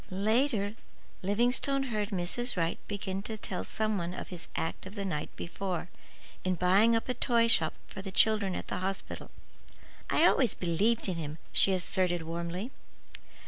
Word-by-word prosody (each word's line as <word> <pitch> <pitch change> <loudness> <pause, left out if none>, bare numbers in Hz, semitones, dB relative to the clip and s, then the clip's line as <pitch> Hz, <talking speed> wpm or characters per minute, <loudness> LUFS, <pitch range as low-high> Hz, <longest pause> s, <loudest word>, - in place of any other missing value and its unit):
Later, 215 +2 +1 0.5
Livingstone 245 +7 +2
heard 210 -1 0
Mrs. 200 +5 -1
Wright 165 -1 0
begin 195 -1 -3
to 220 +2 -5
tell 190 -3 -3
some 215 -2 -1
one 175 +1 -3
of - - -6
his 175 -2 -7
act 165 +3 -3
of 200 - -9
the 200 -2 -3
night 150 -6 -2
before, 180 0 -4 0.5
in 185 0 +1
buying 195 +6 +5
up 225 - 0
a 250 - +1
toy 235 -3 +3
shop 160 -8 +5
for - - -8
the 195 - -5
children 200 -1 +4
at - - -5
the - - -3
hospital. 190 +1 -4 0.8
"I - - +4
always 255 -4 +4
believed 200 +7 +1
in 185 -3 -1
him," 155 -1 -4
she 195 - +4
asserted 180 -1 +1
warmly. 170 +7 -4
195 Hz, 165 wpm, -31 LUFS, 180-220 Hz, 0.8 s, buying